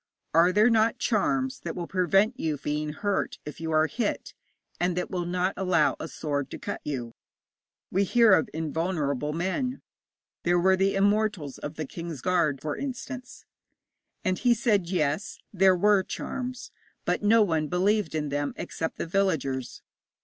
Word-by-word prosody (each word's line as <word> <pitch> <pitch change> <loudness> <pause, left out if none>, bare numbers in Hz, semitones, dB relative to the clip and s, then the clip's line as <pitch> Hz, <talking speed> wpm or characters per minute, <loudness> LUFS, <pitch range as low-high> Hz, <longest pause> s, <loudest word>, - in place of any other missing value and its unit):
'Are 170 +3 +5
there 210 +5 +4
not 225 0 +3
charms 260 +4 0
that 165 - -5
will 175 - -3
prevent 195 +6 +2
you 155 -2 -1
being 150 +2 -2
hurt 200 +6 -1
if 150 +2 -8
you 165 - -3
are 155 0 +4
hit, 215 +6 -3 0.5
and 180 0 0
that 180 - -2
will 175 -2 -2
not 180 +2 0
allow 180 -5 +2
a - - -4
sword 145 -3 -3
to - - -6
cut - - -5
you? 125 -5 -4 0.8
We 195 +2 +2
hear 230 +1 +5
of 160 - +3
invulnerable 155 -3 -1
men. 190 - -2 0.6
There 175 +1 +2
were 190 +2 +4
the 195 +1 +1
Immortals 200 -7 +1
of 145 +1 -6
the 155 - -4
King's 165 -2 -7
Guard, 165 -7 +1
for 150 -1 -3
instance.' 255 -1 -6 0.8
And 185 -1 +1
he 245 -1 +4
said, 210 -6 +1
yes, 165 +1 -1 0.2
there 190 -1 +5
were 205 +2 +4
charms, 255 +6 -5 0.3
but - - 0
no 215 +2 +5
one 160 -5 0
believed 185 0 +1
in 150 -2 -1
them 145 0 -2
except 160 - -4
the - - -3
villagers. 160 -9 -1
180 Hz, 165 wpm, -27 LUFS, 155-205 Hz, 0.8 s, Are